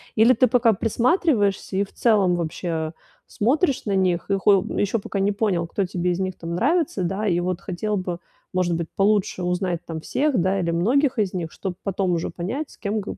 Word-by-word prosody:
Или 225 Hz, +3 st, +6 dB
ты 255 Hz, -, +4 dB
пока 240 Hz, -1 st, +4 dB
присматриваешься 225 Hz, -, +1 dB
и, 200 Hz, -, +3 dB
в 200 Hz, -, -11 dB
целом, 200 Hz, -6 st, +3 dB
вообще 165 Hz, -1 st, -3 dB, 0.3 s
смотришь 275 Hz, -, +1 dB
на 200 Hz, -2 st, 0 dB
них, 180 Hz, -2 st, +1 dB
и 195 Hz, -, +3 dB
хо 195 Hz, -1 st, +4 dB
ещё 205 Hz, +2 st, +1 dB
пока 200 Hz, -, -4 dB
не 200 Hz, +1 st, +2 dB
понял, 200 Hz, -5 st, 0 dB
кто 195 Hz, +3 st, -1 dB
тебе 180 Hz, 0 st, -1 dB
из 175 Hz, -, -2 dB
них, 185 Hz, -1 st, -2 dB
там, 170 Hz, 0 st, -5 dB
нравится, 275 Hz, -, +1 dB
да. 195 Hz, +4 st, -1 dB
И 175 Hz, -2 st, +2 dB
вот 180 Hz, +1 st, -2 dB
хотел 205 Hz, +3 st, -3 dB
бы, 180 Hz, -2 st, -4 dB, 0.3 s
может 180 Hz, -2 st, +1 dB
быть, 165 Hz, 0 st, -3 dB
получше 195 Hz, -2 st, +1 dB
узнать 180 Hz, -1 st, -1 dB
там 160 Hz, -1 st, -5 dB
всех, 280 Hz, -, 0 dB
да, 190 Hz, +2 st, +1 dB
или 170 Hz, -2 st, 0 dB
многих 250 Hz, -, +2 dB
из 200 Hz, -3 st, 0 dB
них, 170 Hz, -4 st, -4 dB
чтоб 190 Hz, -3 st, -5 dB
потом 195 Hz, -1 st, -1 dB
уже 165 Hz, -, -1 dB
понять, 245 Hz, -, -4 dB
с -, -, -17 dB
кем, 210 Hz, +1 st, -2 dB
как 200 Hz, -, -6 dB
195 Hz, 210 wpm, -23 LUFS, 175-220 Hz, 0.3 s, Или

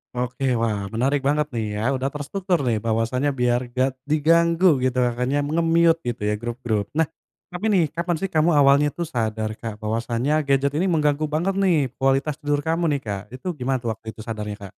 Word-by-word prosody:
Oke, 125 Hz, +2 st, -3 dB, 0.2 s
wah 105 Hz, -3 st, -1 dB
menarik 135 Hz, +5 st, 0 dB
banget 150 Hz, 0 st, +1 dB
nih 110 Hz, -1 st, -1 dB
ya, -, -, -2 dB
udah 130 Hz, +1 st, -1 dB
terstruktur 175 Hz, +4 st, -2 dB
nih. 115 Hz, -2 st, +2 dB
Bahwasannya 115 Hz, +5 st, 0 dB
biar 120 Hz, 0 st, +3 dB
nggak 130 Hz, +2 st, +1 dB, 0.2 s
diganggu 170 Hz, +3 st, +4 dB, 0.2 s
gitu, 130 Hz, 0 st, 0 dB
makanya 125 Hz, +4 st, -1 dB
nge-mute 165 Hz, +2 st, +3 dB
gitu 120 Hz, -3 st, -3 dB
ya 105 Hz, -, +1 dB
grup-grup. 115 Hz, -3 st, -2 dB
Nah, 160 Hz, -2 st, +3 dB, 0.4 s
tapi 180 Hz, +4 st, -6 dB
nih, 185 Hz, -4 st, +4 dB
kapan 170 Hz, 0 st, -1 dB
sih 195 Hz, -, -1 dB
kamu 160 Hz, +2 st, +4 dB
awalnya 140 Hz, +1 st, +5 dB
tuh 170 Hz, -2 st, -4 dB
sadar 110 Hz, -3 st, -2 dB
Kak, 110 Hz, -2 st, -7 dB
bahwasanya 120 Hz, +7 st, 0 dB
gadget 140 Hz, +1 st, +2 dB
ini 170 Hz, -, +1 dB
mengganggu 150 Hz, -1 st, +1 dB
banget 180 Hz, +5 st, 0 dB
nih, 180 Hz, -3 st, +4 dB, 0.2 s
kualitas 135 Hz, +2 st, +1 dB
tidur 145 Hz, 0 st, +1 dB
kamu 165 Hz, +1 st, +1 dB
nih 140 Hz, -, 0 dB
Kak. 100 Hz, -2 st, -3 dB
Itu 130 Hz, +8 st, -8 dB
gimana 130 Hz, -1 st, -1 dB
tuh 115 Hz, -3 st, -3 dB
waktu 110 Hz, 0 st, -9 dB
itu 110 Hz, -, -19 dB
sadarnya 105 Hz, -2 st, -4 dB
Kak? 100 Hz, -1 st, -9 dB
135 Hz, 190 wpm, -23 LUFS, 115-155 Hz, 0.4 s, awalnya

